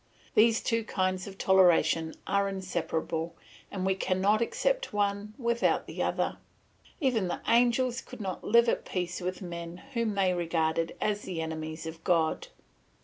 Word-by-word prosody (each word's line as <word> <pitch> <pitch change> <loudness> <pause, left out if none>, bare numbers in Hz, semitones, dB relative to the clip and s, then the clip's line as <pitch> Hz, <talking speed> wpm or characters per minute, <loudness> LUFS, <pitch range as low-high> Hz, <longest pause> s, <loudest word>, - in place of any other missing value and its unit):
These 225 -1 +4
two 230 -1 +1
kinds 185 -3 -1
of 195 -1 -9
toleration 175 -4 +4
are 200 0 +1
inseparable, 170 -3 -3 0.3
and 190 -2 -3
we 190 - +3
cannot 190 +3 +1
accept - - 0
one 205 +1 -1
without 235 -2 +1
the - - -5
other. - - -1 0.6
Even 245 - +1
the 175 - -3
angels 245 +2 +3
could 255 - -11
not 190 -3 -4
live 235 +2 +5
at - - +1
peace 180 -1 -3
with 185 +2 -4
men 170 -1 -6 0.2
whom 230 -4 0
they 190 -2 +2
regarded 165 -1 0
as 210 -1 0
the 185 -5 -5
enemies 160 0 -4
of 160 0 -8
God. 165 -3 +1
190 Hz, 150 wpm, -29 LUFS, 170-220 Hz, 0.6 s, live